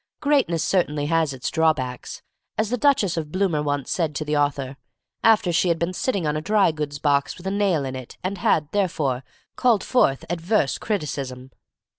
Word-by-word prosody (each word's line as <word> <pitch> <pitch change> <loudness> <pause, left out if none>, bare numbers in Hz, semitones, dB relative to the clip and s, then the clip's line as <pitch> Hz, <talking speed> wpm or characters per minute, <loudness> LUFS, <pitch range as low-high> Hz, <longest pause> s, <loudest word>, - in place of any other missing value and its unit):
Greatness 270 - +2
certainly 150 -6 0
has 165 -1 +1
its 130 -2 -4
drawbacks, 145 -7 -1 0.3
as 220 +1 0
the - - +2
Duchess 230 - +2
of 155 -2 -3
Bloomer 185 -5 +1
once 145 -2 -2
said 160 -4 -1
to 155 - -3
the 150 0 -1
author, 140 -2 0 0.5
after 210 -5 +4
she 180 - +2
had 170 -1 +2
been 170 +2 -2
sitting 195 -3 -1
on 150 0 0
a 155 - -2
dry 200 +1 +3
goods 150 -2 -4
box 140 -1 +1
with 180 - -13
a 190 - -1
nail 195 -8 +1
in 130 0 -4
it, 130 -2 -9
and 185 +1 -3
had, 155 -3 +2
therefore, 150 -10 0 0.3
called 235 -5 +3
forth 140 - +2
adverse 175 - 0
criticism. 135 - -4
160 Hz, 185 wpm, -23 LUFS, 145-195 Hz, 0.5 s, after